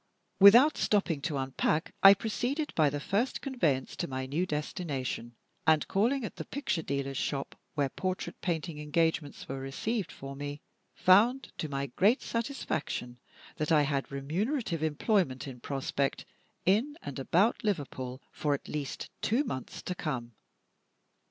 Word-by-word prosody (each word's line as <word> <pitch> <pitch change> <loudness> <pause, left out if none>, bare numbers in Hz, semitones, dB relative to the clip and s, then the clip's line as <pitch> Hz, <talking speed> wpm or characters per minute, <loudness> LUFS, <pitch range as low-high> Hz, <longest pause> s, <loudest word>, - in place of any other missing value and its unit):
Without 235 +10 +8
stopping 185 -8 +1
to 150 -1 -2
unpack, 135 +4 0
I 195 0 +10
proceeded 250 - -2
by 155 -3 +4
the 145 +1 -3
first 205 - 0
conveyance 165 - 0
to 175 - -2
my 130 -1 -3
new 155 +8 -1
destination; 140 -6 -3 0.3
and, 155 -2 +4
calling 240 +6 +1
at - - -7
the - - -5
picture 275 - -2
dealer's 140 -2 -2
shop, 140 -1 -2 0.2
where 140 -2 +1
portrait 185 +6 -4
painting 165 -3 -2
engagements 160 -1 0
were 135 0 -4
received 180 - -2
for 135 0 -8
me, 145 +1 -5 0.4
found 230 +8 +4
to 155 - -2
my 140 0 -2
great 200 - +2
satisfaction 160 - -3 0.4
that 155 +1 -1
I 150 -2 +6
had 140 -1 -1
remunerative 170 - -1
employment 155 - +1
in 125 -2 -8
prospect, 135 +1 -2 0.4
in 235 - +2
and 140 - -5
about 190 - +2
Liverpool, 135 - -3
for 145 -2 0
at - - -9
least 145 -2 -4
two 240 +7 +2
months 130 - -5
to 180 - -2
come. 130 -9 -4
155 Hz, 145 wpm, -30 LUFS, 140-205 Hz, 0.4 s, I